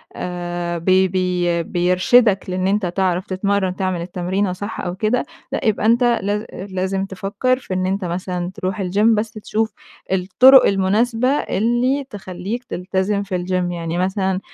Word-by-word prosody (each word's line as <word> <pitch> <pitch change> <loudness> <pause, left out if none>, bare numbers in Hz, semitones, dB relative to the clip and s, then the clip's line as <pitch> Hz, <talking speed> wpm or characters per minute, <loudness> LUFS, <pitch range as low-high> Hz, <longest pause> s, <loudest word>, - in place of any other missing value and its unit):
آآ 175 -1 -4
بي 185 +3 +3
بي 180 -2 0
بيرشدك 185 +5 +3
لإن 185 +1 -1
أنت 205 0 +1
تعرف 180 0 0
تتمرّن 190 0 0
تعمل 185 -3 -2
التمرينة 180 +2 -2
صح 205 +4 -5
أو 175 -1 -4
كده، 215 +5 0 0.3
لأ - - -2
يبقى 215 -1 +1
أنت 235 +3 +4
لاز 210 -4 +1
أ 190 - -7
لازم 190 +1 -1
تفكّر 200 +6 -1
في 195 - -6
إن 185 0 0
أنت 190 0 -1
مثلًا 180 0 -3
تروح 200 0 -3
الgym 205 +5 +3
بس 215 +1 -2
تشوف 220 0 -2 0.4
الطُرُق 245 +8 +6
المناسبة 220 +5 +1
اللي 250 +1 +1
تخلّيك 205 +3 -6
تلتزم 190 0 -2
في 190 -2 -3
الgym. 180 -1 -1
يعني 165 0 -3
مثلًا 190 +1 0
190 Hz, 155 wpm, -20 LUFS, 180-210 Hz, 0.4 s, الطُرُق